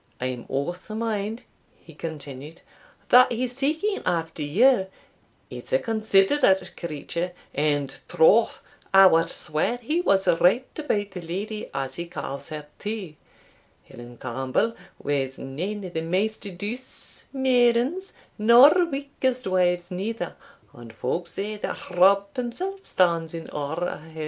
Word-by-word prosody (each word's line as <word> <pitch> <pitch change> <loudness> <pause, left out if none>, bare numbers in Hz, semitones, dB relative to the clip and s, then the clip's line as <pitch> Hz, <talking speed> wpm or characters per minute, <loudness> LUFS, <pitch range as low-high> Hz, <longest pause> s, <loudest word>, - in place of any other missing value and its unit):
I 125 - -2
am 125 -2 -4
o' 140 +5 -1
the 180 +4 -9
mind," 220 +1 -2 0.4
he 165 - -16
continued, 150 0 -7 0.5
"that 250 +1 +7
he's 245 +1 -2
seeking 315 +10 0
after 165 -3 -2
you 190 - +4 0.6
it's - - -8
a - - +5
considerate 215 - +2
creature 170 +2 -4 0.2
and 145 -1 0
troth, 210 +8 +4 0.3
I 195 0 +10
wad 165 -3 +4
swear 155 +10 0
he 300 +8 -1
was 195 - +2
right 180 +8 +4
about 205 -10 -1
the 180 - -7
leddy, 205 +6 -5
as 135 -1 -3
he 170 - -6
ca's 140 -5 -6
her, 150 -1 -6
too 205 -6 -5 0.7
Helen 120 0 -12
Campbell 130 - -1 0.2
was 135 -2 -2
nane 185 +10 -5
o' - - -5
the 160 -2 -3
maist 200 +6 -1
douce 235 +7 -7
maidens, 260 +6 +2 0.2
nor 235 +6 +8 0.2
meekest 275 -3 -2
wives 180 -1 +1
neither, 190 +1 -4 0.4
and 120 -2 -12
folk 170 +9 -2
say 210 +2 -4
that 205 - -6
Rob 195 +3 +5
himsell 275 +11 -4
stands 170 -3 +1
in 165 - -8
awe 145 +1 -3
o' 175 0 -2
her. 160 +1 -12
190 Hz, 140 wpm, -25 LUFS, 160-235 Hz, 0.7 s, I